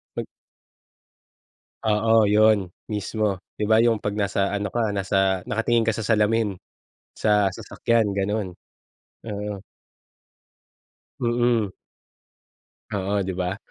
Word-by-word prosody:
'Pag - - -3 1.6
Oo, 110 +1 +4
'yun, 105 -3 +4 0.2
mismo. 110 +1 -2 0.3
'Di - - 0
ba 110 - +5
'yung 115 -2 +3
'pag 105 0 -3
nasa 100 -1 0
ano 100 -1 -2
ka, 110 -4 0
nasa 95 -1 +1
nakatingin 115 +1 +1
ka 110 - +2
sa 110 0 -4
salamin, 110 -1 +2 0.6
sa 105 -2 +2
sasakyan, 115 -2 0
gano'n. 100 0 -1 0.8
Oo. 105 -1 -4 1.6
Mm. 120 -4 +1 1.2
Oo, 100 0 -1
'di 95 - -3
ba? 90 +1 -2
105 Hz, 105 wpm, -24 LUFS, 100-110 Hz, 1.6 s, ba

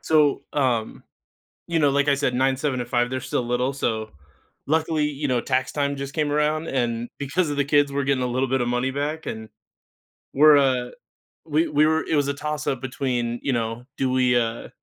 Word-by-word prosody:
so, 150 -3 +3
um, 125 -6 0 0.7
you 170 -1 0
know, 145 -2 +4
like 140 +1 +1
I 140 - +4
said, 140 -3 0
9, 130 +1 +2
7, 135 -2 -1
and 120 - -7
5, 120 0 +1
they're 130 0 -3
still 130 -1 -2
little, 125 +3 0
so 110 -5 -2 0.6
luckily, 155 0 +1
you 145 0 -3
know, 125 -2 +1
tax 130 0 -1
time 140 -1 -1
just 140 0 -6
came 150 -2 0
around, 150 +2 0
and 120 -2 -1
because 150 +4 -1
of 145 - -3
the 140 - +3
kids, 145 0 +3
we're 140 0 0
getting 135 -2 +1
a - - 0
little 130 +1 -1
bit 130 0 +1
of 120 - -1
money 125 +2 0
back 150 +3 -3
and 110 0 -6 0.9
we're, 150 +2 +7
uh, 130 -3 +2 0.6
we 160 +1 +1
we 150 +1 +3
were 160 0 +2
it - - 0
was 145 -1 +2
a 140 - 0
toss-up 150 -3 -3
between, 125 -2 -2
you 140 - 0
know, 115 +1 -3
do 135 - 0
we 125 -1 +3
uh, 115 -1 -2
135 Hz, 210 wpm, -23 LUFS, 125-145 Hz, 0.9 s, we're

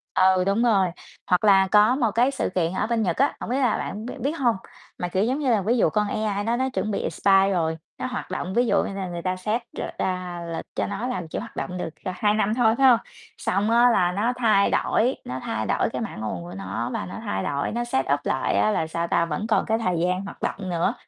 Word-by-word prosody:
Ừ, 185 0 +4
đúng 200 +4 +2
rồi, 195 -6 +3 0.4
hoặc 180 +3 +2
là 195 -2 +5
có 210 +4 +5
một 235 -6 +1
cái 240 +5 +3
sự - - -2
kiện 170 -1 +1
ở 200 - -1
bên 230 -1 0
Nhật 175 -3 -1
á, 280 +2 +2
hổng - - -6
biết 255 - 0
là 250 -5 +2
bạn 215 +3 -5
bi 250 - -6
biết 280 - 0
hông, 240 -3 +3 0.4
mà, 180 - -2
kiểu, 190 +3 0
giống 260 +6 0
như 270 -4 0
là, 215 - +3
ví 225 +6 +1
dụ - - +4
con 210 -1 0
AI 205 -1 -1
nó 230 +2 0
nó 260 +2 0
chuẩn 215 -4 -2
bị - - -1
expire 195 0 +3
rồi, 160 -3 0 0.2
nó - - -4
hoạt 250 -6 -5
động 185 0 -3
ví 245 +1 +3
dụ - - +3
như 195 - -4
là 195 -2 -4
người 175 -1 -5
ta 185 +1 -1
xét 215 +6 -1 0.2
r - - -2 0.2
ra 180 -2 -2
lịch - - -5
cho - - -1
nó 205 +5 -3
làm 185 -10 -3
chỉ - - -4
hoạt - - -9
động 180 - -4
được, 180 - -3 0.2
ờ, 185 - -1
2 210 +2 +2
năm 215 0 +1
thôi 225 -2 +3
phải 270 -1 +5
hông? 235 -2 +5 0.4
Xong 200 +3 0
á, 240 +2 +5
là 180 -7 +3
nó 215 +7 0
thay 215 -5 +3
đổi, 245 +4 +2
nó 130 +1 -4
thay 110 0 -2
đổi - - +1
cái - - -3
mã - - -5
nguồn 105 -5 -4
của 85 - -9
nó 100 +5 -4
và - - -3
nó 90 +2 -8
thay 95 0 -2
đổi, 140 0 -1
nó 240 +2 -1
set 135 - 0
up 145 - +1
lại 130 - 0
á 215 - +3
là, 160 -6 0
sao 170 +1 -2
ta, 170 - +2
vẫn 210 +5 -3
còn 220 - +2
cái 220 - +1
thời 180 -7 -1
gian 180 +2 0
hoạt 200 - -10
động 190 -2 -3
nữa, 175 +5 +1
200 Hz, 275 wpm, -24 LUFS, 180-230 Hz, 0.4 s, là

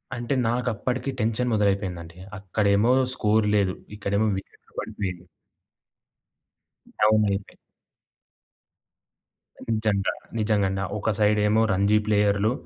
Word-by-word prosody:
అంటే 120 +2 -2
నాకప్పటికి 125 +2 -1
టెన్షన్ 115 +2 0
మొదలైపోయిందండి. 95 -5 -1 0.2
అక్కడేమో 100 +4 +2 0.2
స్కోర్ 105 -2 +2
లేదు. 100 -3 +2 0.2
ఇక్కడేమో 100 +2 0
వికెట్‌లు 95 - -12
పడిపోయిని. 90 -3 -5 1.8
డౌన్ 110 0 +4
అయిపోయే 100 0 -4 2.2
నిజంగా. 105 -3 0 0.3
నిజంగండి. 100 -3 +1
ఒక 110 +2 0
సైడేమో 105 +1 +3
రంజీ 100 +3 +3
ప్లేయర్లు 105 +1 +2
105 Hz, 85 wpm, -25 LUFS, 100-110 Hz, 2.2 s, డౌన్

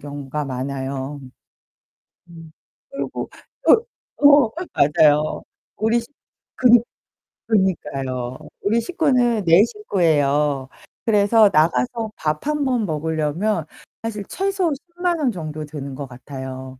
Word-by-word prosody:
경우가 145 0 -5
많아요. 135 +1 -4 1.1
음 165 -2 -12 0.4
그리고 275 - -5 0.9
어, 285 - +4
어 285 -6 +6 0.2
맞아요. 150 0 +3 0.3
우리 225 +3 +1 0.6
그니 245 -2 +6 0.7
그러니까요. 135 - -1 0.2
우리 220 +3 +2
식구는 250 - +1
4 170 +4 +6
식구예요. 150 - 0 0.4
그래서 210 0 +5
나가서 155 - +1
밥 150 - -3
1 300 -1 0
번 250 -4 +1
먹으려면 160 +3 -1 0.4
사실 215 -2 -4
최소 385 -3 0
100,000 345 +3 -3
원 275 -5 +1
정도 155 -5 -6
드는 140 -2 -7
것 140 0 -6
같아요. 130 0 -8
165 Hz, 205 characters per minute, -21 LUFS, 140-230 Hz, 1.1 s, 어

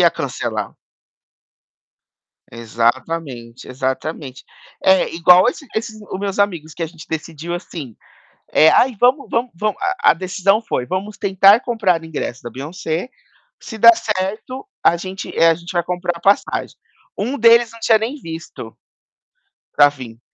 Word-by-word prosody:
Ia - - +6
cancelar. - - -3 1.8
Exatamente, 120 +2 -3
exatamente. 130 +1 -4 0.4
É, 190 0 +4
igual 180 +5 +6
esse 280 +2 -5
esses 220 -1 -4
o 190 - -7
meus 200 0 -4
amigos. 170 -6 -1
Que - - -6
a - - -1
gente 160 -1 -13
decidiu, 160 +1 -6
assim, 160 - -8 0.5
eh: 160 - +5
"Aí, 250 -2 +3
vamos 255 +4 +3
vamos 235 +1 -1
vamos" 210 +3 -2 0.3
A - - +6
decisão 190 +4 0
foi: 125 - -3
"Vamos 195 +5 -4
tentar 195 +2 +5
comprar 200 -10 0
ingresso 150 -5 -5
da 120 - -7
Beyoncé, 160 - -5 0.5
se 220 - -9
der 230 +1 +8
certo 215 - -4 0.2
a 170 - +5
gente, 185 +2 -7
eh, 165 - +5
a 165 - +3
gente 170 +1 -10
vai 175 - +1
comprar 175 -1 -3
passagem". 200 +1 +1 0.4
Um 250 +8 -2
deles 230 0 +5
não 230 - -14
tinha 220 -1 +4
nem 225 +6 -4
visto, 165 0 -9 1.0
para 145 0 +6
vim. 125 -5 -10
180 Hz, 145 wpm, -19 LUFS, 155-215 Hz, 1.8 s, der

